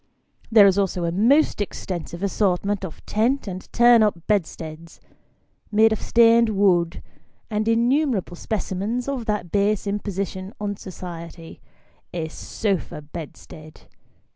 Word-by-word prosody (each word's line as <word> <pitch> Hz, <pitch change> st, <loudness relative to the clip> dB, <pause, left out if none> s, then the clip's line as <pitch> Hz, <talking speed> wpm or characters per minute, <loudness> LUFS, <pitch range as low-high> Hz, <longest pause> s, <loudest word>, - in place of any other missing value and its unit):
There 215 Hz, -3 st, +8 dB
is 195 Hz, 0 st, +4 dB
also 185 Hz, -3 st, -1 dB
a 170 Hz, -, 0 dB
most 235 Hz, -, +3 dB
extensive 175 Hz, -2 st, -5 dB
assortment 200 Hz, 0 st, 0 dB
of 175 Hz, -5 st, -8 dB
tent 235 Hz, +4 st, 0 dB
and 185 Hz, -1 st, -7 dB
turn 240 Hz, -1 st, +6 dB
up 210 Hz, -5 st, +2 dB
bedsteads, 165 Hz, -4 st, -3 dB, 0.7 s
made 220 Hz, +1 st, +5 dB
of 220 Hz, -, -4 dB
stained 230 Hz, 0 st, +5 dB
wood, 185 Hz, -5 st, +2 dB, 0.5 s
and 215 Hz, +1 st, -1 dB
innumerable 235 Hz, -, +1 dB
specimens 215 Hz, +5 st, -3 dB
of 270 Hz, -4 st, -3 dB
that 210 Hz, -5 st, -2 dB
base 205 Hz, 0 st, +1 dB
imposition 200 Hz, -1 st, -4 dB
on 205 Hz, -1 st, -3 dB
society 170 Hz, -3 st, -9 dB, 0.5 s
a 160 Hz, -2 st, -3 dB
sofa 185 Hz, -3 st, -3 dB
bedstead. 155 Hz, 0 st, -10 dB
200 Hz, 120 wpm, -23 LUFS, 175-220 Hz, 0.7 s, There